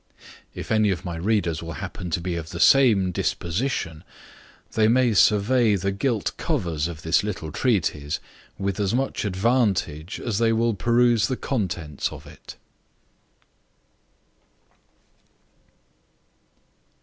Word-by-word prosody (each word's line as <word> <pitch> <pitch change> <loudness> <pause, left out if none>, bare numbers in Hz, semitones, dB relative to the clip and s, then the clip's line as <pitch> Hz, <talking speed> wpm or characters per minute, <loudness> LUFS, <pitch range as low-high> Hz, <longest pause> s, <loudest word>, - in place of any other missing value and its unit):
If - - -7
any 110 -1 +3
of 90 -1 -2
my 85 -2 -4
readers 85 -3 0
happen 90 +2 -6
to 85 - -1
be 90 +1 -3
of 80 -1 -5
the 85 - -7
same 110 -9 +5
disposition, 85 - -2 0.7
they 110 -1 +3
may 120 0 +3
survey 105 +3 +4
the 100 +1 -1
gilt 110 +2 -1
covers 80 -3 -1
of 80 -2 -8
this 80 +4 +2
little 90 -7 -4
treatise 80 - 0 0.4
with 100 0 -2
as 100 +2 0
much 135 -3 -1
advantage 95 -6 0
as 115 -3 -2
they 115 -1 +3
will 115 +1 +1
peruse 120 +2 +3
the 130 - -2
contents 85 - -3
of - - -10
it. - - -12
100 Hz, 120 wpm, -24 LUFS, 85-115 Hz, 0.7 s, same